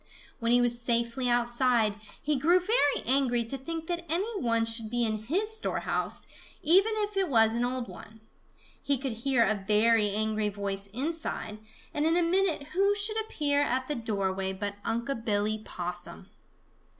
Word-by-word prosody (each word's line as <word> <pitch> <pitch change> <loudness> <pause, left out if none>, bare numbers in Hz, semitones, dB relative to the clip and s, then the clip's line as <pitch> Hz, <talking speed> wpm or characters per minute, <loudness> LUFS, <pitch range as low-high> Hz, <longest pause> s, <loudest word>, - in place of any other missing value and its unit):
When 230 -1 0
he 245 0 +6
was 240 0 0
safely 235 +1 0
outside, 240 -2 +2 0.3
he 300 0 0
grew 330 +7 +4
very 360 - +2
angry 245 -2 +2
to 230 - -3
think 325 +5 -5
that 345 0 -3
any 400 +5 -1
one 230 -2 +2
should 225 -1 -2
be 240 +1 0
in 215 -1 -1
his 410 - -1
storehouse, 440 - -2 0.4
even 390 +7 +5
if 420 -1 -2
it 385 -3 +1
was 225 -4 +4
an 235 +1 0
old 250 -1 -2
one. 220 +1 -12 0.6
He 280 -1 +1
could 265 0 -3
hear 235 +2 +2
a 210 -3 0
very 215 0 +4
angry 215 +1 0
voice 200 -1 -4
inside, 260 -2 -4 0.3
and 295 - 0
in 330 +1 +3
a 350 - +3
minute 335 -4 +1
who 395 +3 +2
should 430 +2 +1
appear 290 -9 0
at 260 -2 0
the 295 - -1
doorway 195 -5 -2
but 200 +1 -4
Unc' 235 +1 -2
Billy 210 0 0
Possum. 175 0 -5
240 Hz, 170 wpm, -29 LUFS, 220-320 Hz, 0.6 s, he